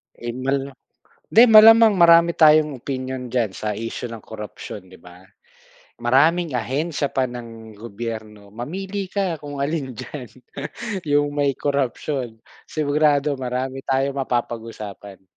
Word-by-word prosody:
Eh, 120 0 -6
mal 135 +1 -1 0.6
di 225 - +8
malamang 225 0 +8
marami 170 -1 +6
tayong 155 -2 +5
opinyon 130 0 -5
diyan 120 -5 0
sa 110 - -4
isyu 115 +3 -5
ng 115 -2 -9
korapsyon, 105 -3 -9
'di 95 0 -16
ba? 90 +2 -16 0.8
Maraming 155 +7 +3
ahensya 140 +5 -2
pa 130 - +1
ng 115 -2 -10
gobyerno, 110 -1 -7
mamili 190 - -5
ka 190 -3 -1
kung 145 -1 -7
alin 140 -2 -2
diyan 125 +2 -8 0.8
yung 145 0 +2
may 145 -1 +1
korapsyon, 135 -4 -2 0.3
sigurado 150 -1 +1
marami 130 +1 -4
tayong 135 +1 0
mapapag-usapan. 115 -6 -5
135 Hz, 120 wpm, -22 LUFS, 115-150 Hz, 0.8 s, di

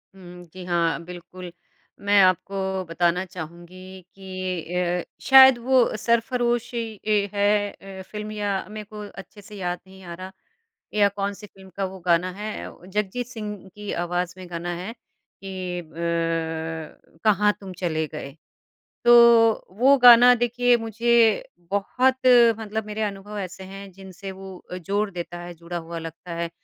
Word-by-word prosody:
उम, 180 -1 -12
जी 185 0 -9
हाँ, 170 -1 0
बिल्कुल। 180 0 -10 0.5
मैं 200 0 +3
आपको 190 +1 +1
बताना 175 +1 +1
चाहूँगी 180 +2 -10
कि 185 -3 -5
अ, 180 -1 0 0.2
शायद 265 -2 +8
वो 250 -1 +3
सरफरोशी 240 +1 0 0.3
ये 205 -2 +2
है 205 0 +2
अ, 195 -1 -11
फ़िल्म 210 0 -5
या 205 -2 -2
मैं 215 0 -7
को 210 +1 -11
अच्छे 200 +2 -12
से 210 +1 -13
याद 180 -2 -3
नहीं 190 0 -15
आ 175 -1 -8
रहा 185 +2 -8 0.6
या 205 -1 +4
कौन-सी 200 +1 -5
फ़िल्म 190 -1 -17
का 195 - -1
वो 190 0 -6
गाना 175 +1 +3
है, 210 +3 -6
व 180 - -17
जगजीत 210 +5 -2
सिंह 215 -4 -6 0.2
की 210 -1 -7
आवाज़ 180 0 -2
में 185 -1 -10
गाना 170 +1 -4
है 185 +6 -6
कि 185 -5 -8
ब 165 -1 -4
कहाँ 210 -1 +4
तुम 195 -2 -8
चले 160 -3 -1
गए। 140 0 -8 0.7
तो 240 - +7 0.7
वो 270 +4 +6
गाना 245 0 +9
देखिए 245 +1 +2
मुझे 225 0 +2 0.3
बहुत 250 +6 +1 0.4
मतलब 220 -1 -4
मेरे 215 +1 -4
अनुभव 205 0 -5
ऐसे 190 -1 -6
हैं, 195 +1 -10
जिनसे 190 +1 -10
वो 190 -1 -11 0.2
जोड़ 200 +4 -1
देता 175 -1 -6
है, 175 0 -8
जुड़ा 170 +1 -7
हुआ 165 0 -7
लगता 165 +1 -8
है। 170 0 -3
190 Hz, 150 wpm, -24 LUFS, 175-210 Hz, 0.7 s, गाना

